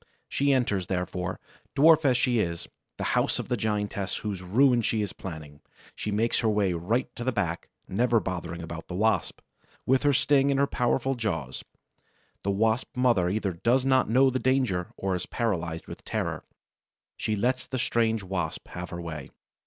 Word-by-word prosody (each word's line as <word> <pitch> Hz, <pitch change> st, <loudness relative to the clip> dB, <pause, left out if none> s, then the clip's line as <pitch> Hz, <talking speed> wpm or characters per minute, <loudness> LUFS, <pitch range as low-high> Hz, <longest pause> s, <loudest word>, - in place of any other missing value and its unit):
She 140 Hz, 0 st, +1 dB
enters, 105 Hz, -9 st, +1 dB
therefore, 90 Hz, 0 st, -3 dB, 0.4 s
dwarf 155 Hz, +2 st, +6 dB
as 130 Hz, -3 st, +4 dB
she 120 Hz, -2 st, +2 dB
is, 85 Hz, -4 st, -2 dB, 0.3 s
the -, -, -3 dB
house -, -, +2 dB
of -, -, -5 dB
the 125 Hz, -, +2 dB
giantess 105 Hz, -3 st, -2 dB
whose 100 Hz, -3 st, -3 dB
ruin 120 Hz, +7 st, +4 dB
she 110 Hz, -1 st, 0 dB
is 100 Hz, -, -4 dB
planning; 75 Hz, -5 st, -8 dB, 0.3 s
she -, -, -4 dB
makes 110 Hz, +3 st, +1 dB
her 115 Hz, -, +2 dB
way 105 Hz, -3 st, +2 dB
right 100 Hz, +10 st, -1 dB
to 120 Hz, -, -5 dB
the 130 Hz, -, +1 dB
back, 90 Hz, -7 st, -2 dB, 0.2 s
never 115 Hz, +3 st, +2 dB
bothering 85 Hz, -3 st, -4 dB
about 80 Hz, 0 st, -7 dB
the 90 Hz, -, -5 dB
Wasp, 110 Hz, +3 st, +1 dB, 0.4 s
with 130 Hz, 0 st, +3 dB
her 145 Hz, -, +4 dB
sting 140 Hz, +1 st, +3 dB
and 140 Hz, -1 st, +2 dB
her 140 Hz, -, +5 dB
powerful 130 Hz, 0 st, 0 dB
jaws. 80 Hz, -, -3 dB, 0.8 s
The 100 Hz, -, -2 dB
Wasp 110 Hz, +6 st, 0 dB
mother 120 Hz, -9 st, +3 dB
either 100 Hz, -1 st, -1 dB
does 120 Hz, +9 st, +2 dB
not 130 Hz, -3 st, +3 dB
know 130 Hz, +3 st, +5 dB
the 130 Hz, -, -1 dB
danger 125 Hz, -10 st, +1 dB
or 95 Hz, -1 st, -1 dB
is 90 Hz, -1 st, -3 dB
paralyzed 90 Hz, -8 st, -2 dB
with -, -, -10 dB
terror. -, -, -3 dB, 0.7 s
She 110 Hz, -, -1 dB
lets 125 Hz, +5 st, 0 dB
the 130 Hz, -, -3 dB
strange 115 Hz, -3 st, +1 dB
Wasp 90 Hz, -4 st, -4 dB
have 90 Hz, +1 st, -6 dB
her 85 Hz, -, -6 dB
way. 80 Hz, -5 st, -6 dB
110 Hz, 180 wpm, -27 LUFS, 90-125 Hz, 0.8 s, dwarf